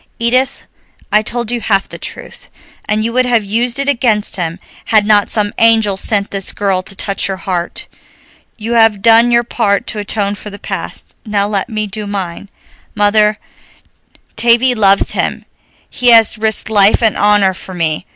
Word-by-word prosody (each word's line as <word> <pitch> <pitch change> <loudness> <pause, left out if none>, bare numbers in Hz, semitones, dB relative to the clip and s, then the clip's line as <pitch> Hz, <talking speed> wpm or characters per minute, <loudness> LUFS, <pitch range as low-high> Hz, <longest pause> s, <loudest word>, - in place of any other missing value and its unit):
Edith, 255 +3 0 0.5
I 210 - +4
told 235 +1 -3
you 240 -1 -3
half 195 -3 0
the - - -4
truth, - - -9 0.4
and 215 +1 0
you 230 - -3
would 255 0 +1
have 235 -3 +1
used 235 +5 -1
it 275 0 -2
against 230 -6 0
him 170 -3 -3 0.3
had 215 -2 +2
not 210 -1 +3
some 205 -2 -1
angel 225 -3 +3
sent 200 +1 +1
this 195 -1 +1
girl 195 -2 -1
to 190 +1 -5
touch 195 0 -1
your 195 -1 -4
heart. 180 -2 -4 0.7
You 230 +1 -4
have 225 -3 +3
done 230 +1 +5
your 235 0 +2
part 205 -4 -1
to 215 - -6
atone 205 -1 -2
for 210 +1 -9
the 200 - -10
past, - - -6
now 205 -2 -1
let 200 0 -2
me 215 -2 -3
do 210 +1 -7
mine. 195 -1 -6 0.5
Mother, 210 0 +2 1.0
Tavie 240 +2 +3
loves 200 -3 +3
him, - - -3 0.4
he 245 0 0
has 225 -1 +6
risked 220 0 -1
life 205 +2 +4
and 220 -3 +3
honor 205 -2 +2
for 185 0 -8
me. 160 -3 -2
210 Hz, 175 wpm, -13 LUFS, 200-230 Hz, 1.0 s, has